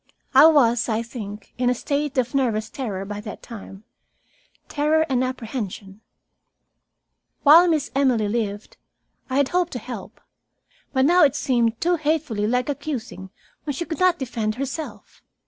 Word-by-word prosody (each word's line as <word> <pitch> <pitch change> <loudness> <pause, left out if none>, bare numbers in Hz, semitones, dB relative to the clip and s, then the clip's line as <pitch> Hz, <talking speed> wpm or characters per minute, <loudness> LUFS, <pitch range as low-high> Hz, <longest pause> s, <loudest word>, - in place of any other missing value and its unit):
I 275 +4 +9
was, 245 -7 +3
I 220 +1 0
think, 210 -3 -9
in 250 -1 +2
a 250 - +1
state 285 +2 -2
of 250 -1 0
nervous 225 -5 0
terror 205 -8 -4
by 205 +1 -6
that 210 0 -9
time, 205 -3 -10 0.8
terror 310 +2 +1
and 255 -3 +1
apprehension. 220 -5 -5 1.4
While 325 +5 +8
Miss 310 -4 0
Emily 255 -6 +2
lived, 205 -1 -3 0.5
I 260 - -1
had 280 -2 +2
hoped 355 -1 0
to - - -3
help. 235 -3 -8 0.7
But 260 -1 +2
now 350 +4 +5
it 280 -2 +4
seemed 235 -5 +1
too 350 +1 +1
hatefully 295 -9 -1
like 250 +2 0
accusing 255 -9 -5 0.4
when 290 -3 -3
she 340 - -3
could 320 - -5
not 365 -1 +3
defend 230 -5 -3
herself. 275 +4 -6
255 Hz, 150 wpm, -23 LUFS, 220-295 Hz, 1.4 s, I